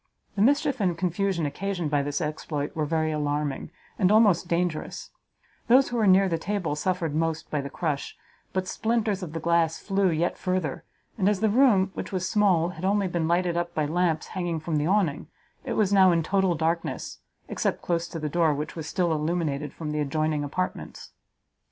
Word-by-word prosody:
The 200 - 0
mischief 285 +1 +2
and 180 -4 +1
confusion 180 -1 0
occasioned 175 +2 -3
by 145 -1 +2
this 145 +3 -2
exploit 150 -1 -3
were 155 -2 -1
very 160 0 0
alarming, 145 -2 -2 0.3
and 185 -1 +4
almost 210 -5 +4
dangerous; 170 -2 -2 0.6
those 260 +3 +5
who 245 - -2
were 220 -3 +3
near 190 +1 +6
the 165 -3 -1
table 180 -5 -2
suffered 170 0 -1
most 160 0 -2
by 150 - 0
the 140 - -6
crush, 150 -2 -3 0.3
but 185 0 -2
splinters 220 -3 0
of 170 -4 -6
the 165 - -3
glass 165 0 +2
flew 195 -1 +1
yet 170 +1 -1
further; 185 -7 -2 0.4
and 195 +1 +3
as 205 -2 0
the 220 -1 +2
room, 210 -6 +4
which - - -6
was 185 -1 -1
small, 185 -5 +3
had 180 - -9
been 190 - +1
only 200 -1 +1
lighted 175 +1 0
up 175 0 -2
by 155 - +1
lamps 165 0 0
hanging 175 -3 -2
from 155 0 -2
the 150 +1 0
Awning, 180 -7 +1 0.4
it - - -3
was 205 -2 +2
now 190 -2 +6
in 165 -1 +2
total 190 0 +1
darkness, 165 +2 -2 0.3
except - - -2
close 170 -1 -1
to 165 - -7
the 155 -1 -3
door, 160 0 +2
which 150 +2 -5
was 160 -2 -6
still 175 0 0
illuminated 155 -2 -1
from 155 -2 -6
the 150 - -2
adjoining 150 +1 0
apartments. 180 +6 -4
170 Hz, 195 wpm, -26 LUFS, 155-190 Hz, 0.6 s, near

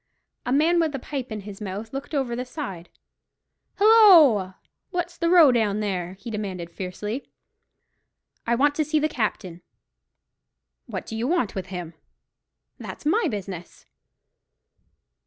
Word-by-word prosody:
A - - 0
man 320 +6 +3
with 315 -4 0
a - - -1
pipe 260 -1 -5
in 215 -1 -4
his 200 +1 -10
mouth 210 +3 -6
looked 275 +3 -5
over 260 -4 -1
the 250 - -3
side. 245 - -7 0.9
"Hilloa! 340 - +6 0.3
what's 350 -1 -3
the 335 0 0
row 335 -6 +7
there?" 205 -6 -1
he 205 +4 -9
demanded 190 -5 -5
fiercely. 210 +7 -5 1.2
"I 235 - +3
want 285 +4 +3
to 310 - +2
see 310 +1 0
the 305 0 +2
captain." 200 - -3 1.3
"What - - -5
do 225 - -7
you 230 +3 -2
want 315 - 0
with 190 -1 -5
him?" 180 -3 -6 0.9
"That's - - -9
my 425 +10 +2
business." 190 -5 -7
235 Hz, 140 wpm, -24 LUFS, 195-305 Hz, 1.3 s, row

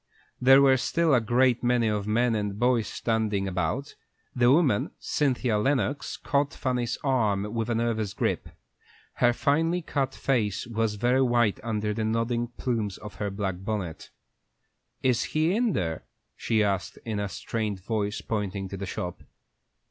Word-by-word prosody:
There 135 +2 +7
were 135 -1 +6
still 165 +4 +1
a 125 - +5
great 120 +2 +2
many 120 -2 +2
men 105 +3 +1
and 105 -2 -2
boys 120 -2 +2
standing 110 -4 -1
about. 95 - -2 0.4
The 120 -1 +4
woman, 140 -8 +3
Cynthia 125 -6 0
Lennox, 135 +2 0
caught 140 0 0
Fanny's 125 -3 -1
arm 105 -6 +1
with 115 0 -2
a 120 - +1
nervous 110 -3 -1
grip. - - -1 0.7
Her 120 - +4
finely 160 +7 +1
cut 135 -4 -2
face 115 -7 0
was 115 -2 -1
very 125 +5 +2
white 120 -5 +2
under 105 -2 -2
the 110 +1 -2
nodding 115 +2 0
plumes 115 -5 -3
of 105 -2 -9
her 100 - 0
black 95 -2 -3
bonnet. 95 -5 -4 0.9
"Is 125 -3 +3 0.2
he 160 +5 +3
in 230 -3 +2
there?" 80 -3 -2 0.3
she 110 -2 +1
asked, 100 -2 -1
in 110 -3 -2
a 100 -1 -2
strained 105 -1 -3
voice, 105 +1 -2
pointing 100 -3 -3
to 95 - -6
the 100 0 -5
shop. 90 0 -5
115 Hz, 155 wpm, -27 LUFS, 105-130 Hz, 0.9 s, There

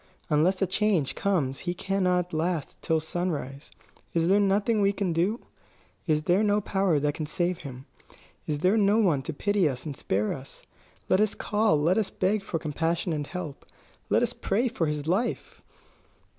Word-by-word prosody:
Unless 180 +6 +3
a - - +4
change 185 -6 +1
comes 150 -10 0
he 175 0 -3
cannot 180 -2 0
last 160 -1 -2
till 160 0 +1
sunrise. 155 -4 -4 0.5
Is 165 0 +2
there 195 +3 +4
nothing 205 +2 +2
we 200 0 +4
can 195 -4 -1
do? 185 +8 0 0.7
Is 155 -1 +2
there 180 +5 +3
no 210 -1 +3
power 190 -5 +1
that 145 0 0
can 155 0 -4
save 175 +2 -1
him? 130 -2 -9 0.6
Is 150 - -1
there 185 +8 +3
no 205 0 +4
one 175 -11 +3
to - - -5
pity 200 +1 +1
us 130 +1 -5
and 145 -3 -5
spare 105 -3 -1
us? 135 0 -11 0.4
Let 190 - +3
us 215 -1 +1
call, 210 -6 +1
let 170 +8 +3
us 205 -3 -1
beg 200 +3 0
for 180 - -3
compassion 165 +3 -1
and 145 -2 -3
help; 180 -6 -6 0.5
let - - +3
us - - 0
pray 225 +6 0
for 170 -8 -1
his 150 0 -3
life!" 200 +8 -1
175 Hz, 180 wpm, -27 LUFS, 150-200 Hz, 0.7 s, a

